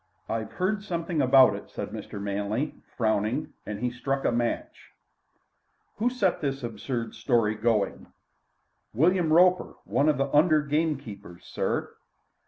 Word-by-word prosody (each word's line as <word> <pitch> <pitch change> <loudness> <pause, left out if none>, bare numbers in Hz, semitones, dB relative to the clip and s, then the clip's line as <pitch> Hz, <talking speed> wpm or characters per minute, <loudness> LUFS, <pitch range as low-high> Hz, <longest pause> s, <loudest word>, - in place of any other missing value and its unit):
"I've 110 -1 -3
heard 200 +3 -1
something 170 -5 -2
about 130 0 +6
it," - - -9
said - - -5
Mr. - - -7
Manley, 100 +7 -2 0.2
frowning, 110 +4 0
and 105 0 -5
he 125 0 0
struck 135 +3 -2
a - - +3
match. 120 0 -3 1.0
"Who 230 +4 +2
set 200 -8 0
this 135 -2 -2
absurd 120 0 -4
story 115 -5 +1
going?" 110 -2 0 0.9
"William 170 +4 +3
Roper, 180 +2 +4
one 130 +10 +1
of 150 - +2
the 135 0 -1
under 155 0 +5
gamekeepers, 140 - -3
sir." - - -2
135 Hz, 135 wpm, -27 LUFS, 110-160 Hz, 1.0 s, about